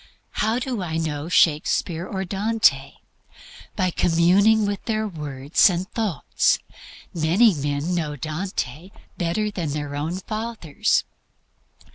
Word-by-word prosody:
How 220 +2 +1
do 250 -4 -3
I 160 -3 -3
know 155 -1 -3
Shakspere 165 +1 +2
or 190 -1 -3
Dante? 195 -9 +1 0.8
By 185 -1 +1
communing 190 +7 +4
with 200 -1 -3
their 220 -1 -1
words 145 -3 +2
and 180 +1 -2
thoughts. 205 - +1 0.6
Many 180 +7 +4
men 145 +3 -2
know 155 -4 -2
Dante 155 0 -4 0.3
better 210 +5 0
than 175 -6 -3
their 145 -1 -4
own 155 +5 -2
fathers. 215 -5 -1
175 Hz, 115 wpm, -23 LUFS, 150-205 Hz, 0.8 s, communing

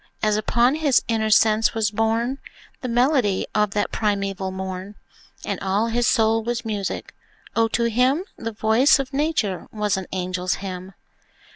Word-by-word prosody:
as 215 -1 +3
upon 235 +4 +2
his 295 -5 +2
inner 220 -1 0
sense 215 +2 +4
was 215 -2 +1
borne 225 +5 0 0.4
The 255 - -3
melody 245 -4 +2
of 210 0 +2
that 205 - 0
primeval 195 -3 -1
morn, 190 +1 -6 0.5
And - - -3
all 200 +4 0
his 235 0 +1
soul 225 0 +3
was 240 +1 -3
music, 205 -3 -4 0.4
O, 225 0 +3
to 235 +1 -1
him 250 - +2
The 230 0 -5
voice 225 +8 +4
of 275 0 -4
Nature 275 - -1
was 210 -2 0
an 190 - -5
angel's 185 0 -2
hymn! 185 0 -7
220 Hz, 155 wpm, -23 LUFS, 195-240 Hz, 0.5 s, sense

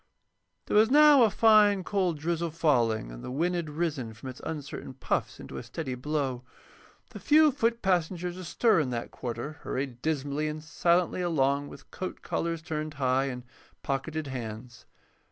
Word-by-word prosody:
There - - -2
was 215 +2 +6
now 295 0 +7
a 225 - +6
fine, 210 -3 +5
cold 185 -4 0
drizzle 170 +2 -1
falling, 120 - +1
and - - -10
the - - -6
wind 165 +8 0
had 170 -3 -2
risen 150 -8 -3
from 120 +4 -8
its 130 - -10
uncertain 145 -4 -6
puffs - - -2
into - - -8
a - - -8
steady 130 +3 -5
blow. 135 -1 -2 0.7
The - - -8
few 305 0 +5
foot 235 -3 0
passengers 180 -1 0
astir 185 +3 +2
in 145 -5 0
that 120 -1 -4
quarter 125 +5 -6
hurried 130 -2 -4
dismally 145 0 -1
and 150 0 -5
silently 175 +2 +1
along 145 -4 +1
with 140 - -13
coat 185 - -6
collars 165 -1 -2
turned 155 -1 -4
high 130 -1 +1
and 125 -2 -5 0.4
pocketed 150 +3 -2
hands. 120 -2 -7
155 Hz, 165 wpm, -28 LUFS, 130-175 Hz, 0.7 s, now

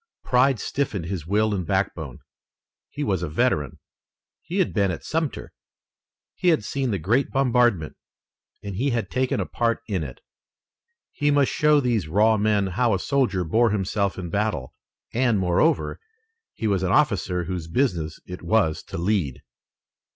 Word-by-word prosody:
Pride 125 -1 +3
stiffened 105 -8 -2
his 85 -3 -5
will 105 +2 +2
and 95 -3 -1
backbone. 85 -7 -2 0.7
He 145 - -4
was 95 - 0
a 90 - -3
veteran. 75 - 0 0.6
He 180 - -5
had 190 - +1
been 100 -3 +2
at 85 - -4
Sumter. 160 -2 -3 0.8
He 180 - -3
had 160 -10 +4
seen 135 +3 -2
the 100 - 0
great 110 - +1
bombardment, 120 - +2 0.7
and 100 -2 -5
he 135 +6 +1
had 120 -3 -2
taken 130 0 0
a - - -1
part 115 -1 -1
in 95 -6 -1
it. 65 -4 -9 0.9
He 145 -1 0
must 145 -2 +3
show 150 0 +4
these 120 - 0
raw 105 +7 +4
men 105 -1 +2
how 105 +4 +1
a - - -2
soldier 125 -10 +1
bore 115 +8 +3
himself 100 -1 -1
in 90 -3 -5
battle, 100 -11 -1 0.4
and, 120 -2 +2
moreover, 95 - +1 0.6
he 115 - -4
was 100 -3 +1
an 95 -1 0
officer 95 - +2
whose 85 -2 -4
business 85 - -1
it 90 0 -8
was 85 -3 +1
to - - -7
lead. 85 -7 -1
105 Hz, 160 wpm, -24 LUFS, 90-125 Hz, 0.9 s, had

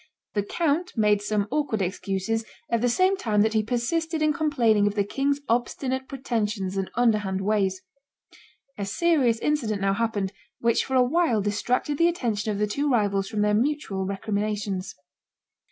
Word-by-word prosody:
The 205 - +1
count 330 - -1
made 210 -2 +3
some 205 -1 0
awkward 290 -7 0
excuses, 195 +3 -2 0.3
at 230 -1 +2
the 245 - +2
same 370 +10 +3
time 210 - +1
that 220 0 +1
he 220 - +3
persisted 310 +8 -1
in 305 0 +3
complaining 240 -10 +2
of 205 - -1
the 205 - +2
king's 280 +7 -1
obstinate 260 +2 -1
pretensions 215 -7 -2
and 195 -1 -2
underhand 210 -5 +1
ways. 195 -2 0 1.0
A 200 - -1
serious 260 - +2
incident 230 -7 0
now 195 0 +1
happened, 205 -3 -1 0.3
which 235 0 +2
for 265 - -2
a 255 - +6
while 305 -3 +2
distracted 240 +8 -1
the 335 - +5
attention 230 - -1
of 205 - -2
the 210 - +1
two 280 +8 -1
rivals 200 -5 +1
from 215 -1 -2
their 210 0 +2
mutual 215 -6 0
recriminations. 200 -1 -2
220 Hz, 165 wpm, -25 LUFS, 205-275 Hz, 1.0 s, a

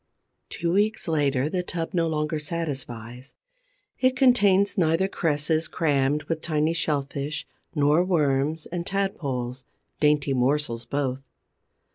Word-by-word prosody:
Two 170 0 -2
weeks 210 +1 +1
later, 145 -4 +1
the 180 +3 -1
tub 170 -2 -4
no 170 -2 +1
longer 150 0 -1
satisfies. 130 -6 -5 0.6
It 255 0 +3
contains 205 -7 +4
neither 170 +1 +2
cresses 155 -2 0
crammed 145 -2 +1
with 160 +2 -3
tiny 155 0 0
Shellfish 145 -2 -1 0.3
nor 150 +3 +4
Worms 150 -3 +1
and 175 0 -4
Tadpoles, 135 -10 -2 0.4
dainty 150 -2 +2
morsels 125 -2 0
both. 135 -1 -3
150 Hz, 115 wpm, -25 LUFS, 140-170 Hz, 0.6 s, contains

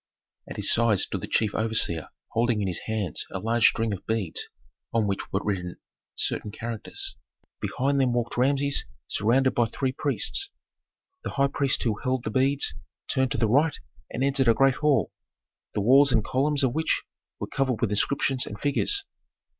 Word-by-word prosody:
At - - -7
his - - +2
side 115 -3 +3
stood - - -1
the - - -5
chief 110 -2 +1
overseer 110 -8 +1 0.2
holding 115 -1 +1
in 100 - -1
his 90 - -1
hands 105 -7 -2
a - - -4
large 115 +3 +3
string 115 -2 -1
of 95 - -7
beads 110 -8 -2 0.4
on 115 -2 +1
which 100 -1 -3
were 95 - 0
written 90 -4 -3 0.4
certain - - 0
characters. 115 0 -6 0.5
Behind 140 +2 0
them 130 -2 +2
walked 120 -1 -1
Rameses 140 +2 +2 0.2
surrounded 130 +5 +2
by 120 -1 +2
three 130 +3 -2
priests. 145 - +1 0.7
The - - -3
high 140 0 +1
priest 140 -2 +1
who 110 -4 -1
held 130 -1 0
the 110 - -3
beads 135 +4 +1 0.3
turned 130 -1 +1
to - - -2
the 115 - +2
right 145 +8 +2 0.3
and 130 - -3
entered 135 -1 +2
a 115 - +5
great 135 +2 +3
hall, 150 -3 +2 0.6
the 105 - +1
walls 135 +6 +6
and 115 -3 +2
columns 140 +2 +1
of 125 -3 +2
which 160 +1 0 0.4
were - - -3
covered 130 -4 -1
with 115 - 0
inscriptions 130 +4 +1
and 100 - -7
figures. 395 - +1
120 Hz, 180 wpm, -26 LUFS, 110-135 Hz, 0.7 s, walls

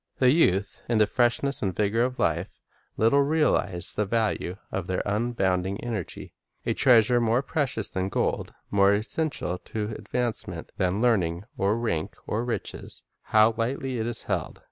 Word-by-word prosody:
The 125 -1 +5
youth, 100 - +2
in 115 - +2
the 105 - +5
freshness 125 +4 +1
and 95 -4 -1
vigor 105 +2 +1
of 125 0 -2
life, 85 +3 -1 0.4
little 115 +6 +4
realize 140 - +1
the 105 -1 -1
value 105 -4 -1
of 95 -3 -3
their 95 - -1
abounding 100 -3 0
energy. 110 -7 -5 0.3
A - - +1
treasure 120 -1 +5
more 115 +3 +2
precious 130 -8 -1
than 95 0 -2
gold, - - -1 0.2
more 100 0 +5
essential 110 - -2
to 110 0 -4
advancement 105 -5 -3
than 95 +2 0
learning 90 -7 +2
or 100 +3 +1
rank 95 -10 -2
or 110 +2 -1
riches, 120 -1 -5
— - - -51
how 110 +1 +6
lightly 125 +2 -2
it 110 - -1
is 120 -1 -4
held - - -3
110 Hz, 160 wpm, -26 LUFS, 95-120 Hz, 0.4 s, how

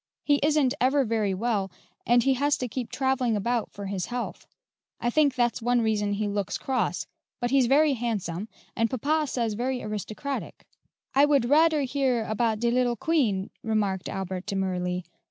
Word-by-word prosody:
He 290 -1 +3
isn't 295 -3 +3
ever 270 +2 +3
very 215 -4 0
well, 205 -2 -1 0.4
and 240 0 +5
he 270 - +3
has 285 +3 +1
to 250 - -3
keep 245 +1 -4
travelling 265 -3 +1
about 235 +3 -1
for 200 - -7
his 190 -2 -3
health. 245 0 -5 0.5
I 240 - 0
think 290 -1 +3
that's 240 -2 +1
one 245 +1 +2
reason 210 -2 0
he 210 +1 -1
looks 200 -2 -2
cross; 265 -1 -1 0.3
but 245 -1 -1
he's 270 -3 +4
very 290 +3 +4
handsome, 215 -6 -3 0.3
and 230 0 +1
papa 300 +6 0
says 235 -4 -1
very 250 +4 -2
aristocratic." 215 +6 -5 0.5
"I 275 +2 +6
would 285 -4 +3
radcr 305 +3 +4
hear 255 -4 0
about 220 0 0
de 235 +1 +1
little 245 -1 +2
Queen," 225 -9 0
remarked 205 -4 -1
Albert 190 0 -4
demurely. 180 -2 -1
240 Hz, 170 wpm, -26 LUFS, 205-265 Hz, 0.5 s, I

